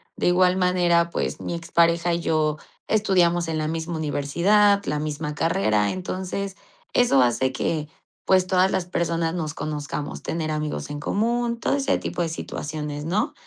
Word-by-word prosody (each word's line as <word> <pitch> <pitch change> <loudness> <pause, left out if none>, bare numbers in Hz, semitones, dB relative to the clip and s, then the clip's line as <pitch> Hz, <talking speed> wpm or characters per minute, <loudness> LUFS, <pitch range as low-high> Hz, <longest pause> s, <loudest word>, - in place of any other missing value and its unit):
De - - 0
igual 180 +1 +4
manera, 175 -2 +3
pues, - - -3
mi 170 - -3
expareja 170 +1 +2
y 170 - 0
yo 155 -2 +1 0.3
estudiamos 175 -5 +2
en 160 - -2
la 155 0 -1
misma 165 +1 -3
universidad, 175 +8 +2
la 150 0 -1
misma 150 0 -3
carrera. 105 -9 +1
Entonces, 190 +1 -4 0.4
eso 235 - +4
hace 130 +2 +1
que, 150 +3 -2 0.4
pues, 185 -1 +4
todas 185 0 +3
las 175 - 0
personas 170 -1 -1
nos 155 -4 -3
conozcamos, 145 -1 -4
tener 160 -1 -2
amigos 150 -1 -3
en 145 - -5
común, 235 +6 0
todo - - 0
ese 275 -1 +1
tipo - - -4
de 170 - 0
situaciones, 150 -2 -5
¿no? 210 - 0
170 Hz, 160 wpm, -24 LUFS, 150-185 Hz, 0.4 s, igual